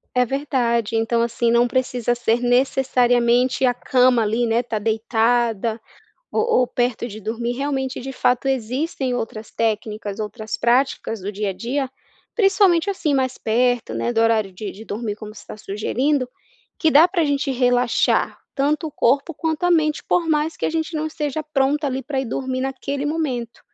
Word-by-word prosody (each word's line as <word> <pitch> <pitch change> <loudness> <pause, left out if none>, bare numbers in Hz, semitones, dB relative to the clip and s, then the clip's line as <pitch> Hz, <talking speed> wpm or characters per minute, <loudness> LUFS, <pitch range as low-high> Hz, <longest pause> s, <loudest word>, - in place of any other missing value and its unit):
É 250 0 +4
verdade, 240 -4 0
então 225 +1 +1
assim 235 0 +1
não 235 +1 +4
precisa 245 -1 0
ser 240 0 +1
necessariamente 245 0 +2
a 245 -1 +3
cama 250 -1 +3
ali, 225 +3 0
né, 230 +1 +2
está 230 -3 -3
deitada, 225 0 +1 0.5
ou 435 - +1 0.2
ou 250 - +1
perto 240 -1 -1
de 215 -2 -8
dormir 230 +3 -3
realmente, 265 0 -2
de 270 +2 -6
fato 250 +1 +1
existem 265 +1 -1
outras 220 -2 -5
técnicas, 215 -2 -2
outras 215 +1 -4
práticas 240 -2 +1
do 200 +3 -4
dia 205 0 -2
a - - -3
dia. 255 +7 -2 0.5
Principalmente 390 -4 +3
assim, 335 -7 -1
mais 260 -1 0
perto, 245 +2 +1
né, 240 - -1
do 225 - +2
horário 220 -4 +2
de 200 +2 -6
de 220 +3 -12
dormir 210 0 -4
como 215 -1 -9
você 215 - -12
está - - -10
sugerindo, 250 +7 -1 0.5
que 320 -3 +2
dá 305 +4 +7
pra 350 -2 0
gente 285 0 0
relaxar 245 -1 +2
tanto 295 +3 0
o - - -8
corpo 275 +6 +1
quanto 320 +1 -2
a 355 - +3
mente 310 -2 +2
por 340 -2 0
mais 305 +1 +1
que - - -3
a - - 0
gente 325 0 -2
não 310 0 -1
esteja 305 -1 -3
pronto 295 0 0
ali 265 -2 -2
pra 270 +1 -2
ir - - -4
dormir 255 +2 -3
naquele 270 +2 -3
momento. 265 -7 -3
250 Hz, 175 wpm, -21 LUFS, 230-280 Hz, 0.5 s, dá